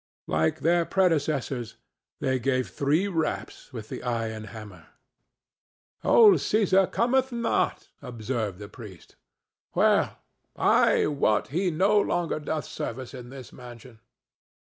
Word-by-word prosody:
Like 80 +1 0
their 170 +1 +3
predecessors, 150 - 0 0.5
they 130 -1 0
gave 130 +1 0
three 150 +8 +1
raps 165 -6 -3
with 110 -4 -8
the - - -6
iron 115 -3 -3
hammer. 105 -6 -11 1.2
"Old 435 -4 +7
Cæsar 195 -3 +2
cometh 260 +2 +1
not," 235 -1 -1
observed 115 -4 -4
the 100 +1 -9
priest. 100 -6 -13 0.6
"Well, - - +3 0.4
I - - +3
wot 140 -8 +1
he 180 +6 0
no 195 +6 +3
longer 175 -4 -1
doth 150 -2 -3
service 130 +3 -6
in 125 -2 -9
this 130 -2 -11
mansion." 120 -2 -12
135 Hz, 120 wpm, -26 LUFS, 115-175 Hz, 1.2 s, Old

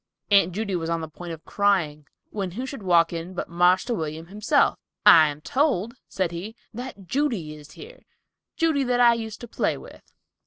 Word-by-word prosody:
Aunt 195 -3 +5
Judy 200 +1 -3
was 165 -1 -3
on 165 0 -1
the 160 - -5
point 170 +2 -9
of 160 -1 -9
crying, 170 -8 0 0.2
when 195 -3 -3
who 250 +6 -4
should 265 -3 -7
walk 175 -3 +3
in 170 +2 -6
but - - -4
"Marster 180 +7 +3
William" 160 -4 -4
himself. 210 - +1 0.3
"I 160 -2 +9
am 145 0 -6
told," 235 - 0 0.2
said 185 -3 -1
he, 190 +7 -7 0.2
"that 240 -4 -8
Judy 230 - -1
is 150 -1 -13
here, 475 +4 -12 0.6
Judy, 320 -4 +2
that 245 0 +1
I 240 -1 +7
used 220 -2 -6
to 240 - -8
play - - -1
with." - - -14
190 Hz, 190 wpm, -24 LUFS, 165-235 Hz, 0.6 s, I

